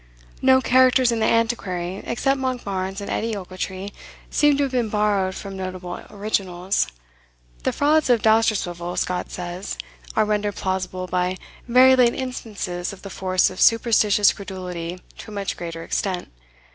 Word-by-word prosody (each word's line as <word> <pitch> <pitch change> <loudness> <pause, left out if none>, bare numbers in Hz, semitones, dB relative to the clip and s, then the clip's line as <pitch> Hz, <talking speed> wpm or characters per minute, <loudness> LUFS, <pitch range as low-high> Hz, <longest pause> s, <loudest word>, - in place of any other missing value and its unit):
No 260 0 +5
characters 255 -1 +4
in 230 - 0
the 220 - +2
"Antiquary," 195 -6 0
except 270 +3 +1
Monkbarns 200 -7 -3
and 200 - -6
Edie 225 0 -1
Ochiltree, 190 +1 -5 0.4
seem 295 -1 +4
to 285 - +2
have 275 - -1
been 245 -4 0
borrowed 205 -3 +1
from 195 -1 -7
notable 185 -1 -6
originals. 195 -2 -1 0.7
The - - 0
frauds 300 0 +2
of 235 -3 +3
Dousterswivel, 195 -6 +1
Scott 180 0 -1
says, 180 - -5 0.4
are - - +3
rendered 210 -1 -1
plausible 185 -1 -2
by 180 0 -1 0.3
"very 255 +2 +7
late 245 -2 +4
instances 210 -9 -4
of 195 - -13
the 195 - -8
force 185 0 +1
of 185 - -6
superstitious 215 -3 +4
credulity 180 -3 -6 0.2
to - - -9
a - - -9
much 200 -1 -2
greater 165 -1 -6
extent." 185 +1 -2
200 Hz, 150 wpm, -23 LUFS, 185-235 Hz, 0.7 s, very